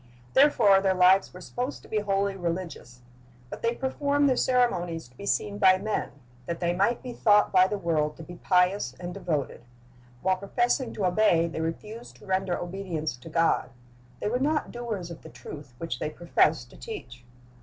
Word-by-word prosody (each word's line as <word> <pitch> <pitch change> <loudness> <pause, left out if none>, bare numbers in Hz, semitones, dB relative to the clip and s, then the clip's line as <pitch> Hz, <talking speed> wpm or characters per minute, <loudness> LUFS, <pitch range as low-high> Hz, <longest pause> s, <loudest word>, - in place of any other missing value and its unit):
Therefore 205 -9 +5
their 190 -1 +2
lives 185 +1 +5
were 180 - -11
supposed 250 +9 -5
to - - -14
be 215 - 0
wholly 200 -1 0
religious. 170 -8 -5 0.5
But - - -7
they 230 +1 0
performed 285 +2 +1
their 260 - +3
ceremonies 180 - +1
to 125 - -25
be 200 - -8
seen 205 0 -1
by 190 -2 +6
men, 210 +3 -3 0.3
that 170 - -3
they 175 -1 0
might 200 +7 +1
be 250 -1 -6
thought 210 -2 +4
by 185 -1 +5
the 210 - -2
world 155 -5 -1
to 165 - -9
be 175 +2 -10
pious 180 -8 +1
and 175 0 -6
devoted. 150 -9 -3 0.6
While 185 0 +2
professing 240 +6 0
to 200 - -1
obey, 180 -3 +3
they 165 -1 -4
refused 210 +8 -6
to - - -16
render 190 -1 0
obedience 175 -5 -4
to 125 +6 -12
God. 165 -5 +1 0.5
They - - -2
were 245 +4 0
not 300 +3 0
doers 215 -8 -5
of 165 - -9
the 160 - -11
truth 145 -5 -10
which 125 -6 -4
they - - -2
professed 155 -5 +1
to - - -15
teach. 120 - -9
185 Hz, 185 wpm, -27 LUFS, 165-215 Hz, 0.6 s, by